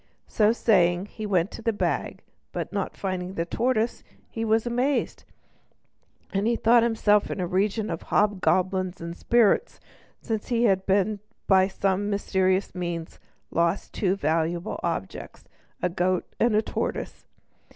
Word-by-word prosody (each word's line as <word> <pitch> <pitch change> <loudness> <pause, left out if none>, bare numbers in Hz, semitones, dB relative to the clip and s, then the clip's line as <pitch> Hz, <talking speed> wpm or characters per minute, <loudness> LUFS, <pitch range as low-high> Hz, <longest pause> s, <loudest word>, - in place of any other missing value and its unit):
So 215 0 +3
saying, 180 -6 +3
he 215 +1 -7
went 185 -1 +1
to - - -8
the 230 - +1
bag, 205 - -2 0.3
but - - -5
not - - -3
finding 185 -1 -3
the 165 - -1
tortoise 235 +4 0 0.3
he 225 - -3
was 225 +1 +2
amazed, 250 +4 -1 1.1
and 200 +2 +1 0.2
thought 235 +1 +6
himself 220 -3 +2
in - - -4
a 180 - 0
region 200 +4 0
of - - -4
hobgoblins 185 -2 +1
and 170 0 -6
spirits, 235 - +2 0.4
since 220 -3 -4
he 240 -2 +1
had 195 -5 +3 0.6
by 190 -1 +5
some 195 +1 -1
mysterious 190 -1 0
means 175 -2 -5 0.3
lost 170 +3 0
two 190 -2 +1
valuable 165 0 -1
objects, 165 - -5 0.4
a 180 - +2
goat 180 0 0
and 230 -2 +3
a 215 - +3
tortoise! - - -4
195 Hz, 140 wpm, -25 LUFS, 180-220 Hz, 1.1 s, thought